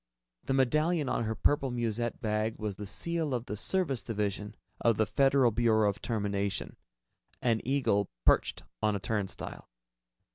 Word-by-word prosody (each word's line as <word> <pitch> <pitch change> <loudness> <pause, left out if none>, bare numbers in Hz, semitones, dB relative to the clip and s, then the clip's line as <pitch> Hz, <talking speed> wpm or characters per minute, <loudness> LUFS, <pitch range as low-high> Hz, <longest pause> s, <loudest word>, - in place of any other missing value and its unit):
The 135 - 0
medallion 150 +4 +2
on 115 - 0
her 110 +1 -2
purple 140 +4 +2
musette 120 -1 -2
bag 110 -1 -1
was 105 -2 -3
the 105 - -6
seal 150 - -1
of 120 0 -3
the 105 - -4
Service 140 - 0
Division 105 -1 -3 0.2
of 115 -3 +3
the 110 - +3
Federal 135 0 +4
Bureau 110 -1 +3
of 100 - -2
Termination, 100 -3 -2 0.6
an 115 -2 +1
eagle 125 -7 +1 0.2
perched - - +3 0.2
on 105 -1 +2
a - - -1
turnstile. 100 -1 -4
115 Hz, 150 wpm, -30 LUFS, 105-135 Hz, 0.6 s, Federal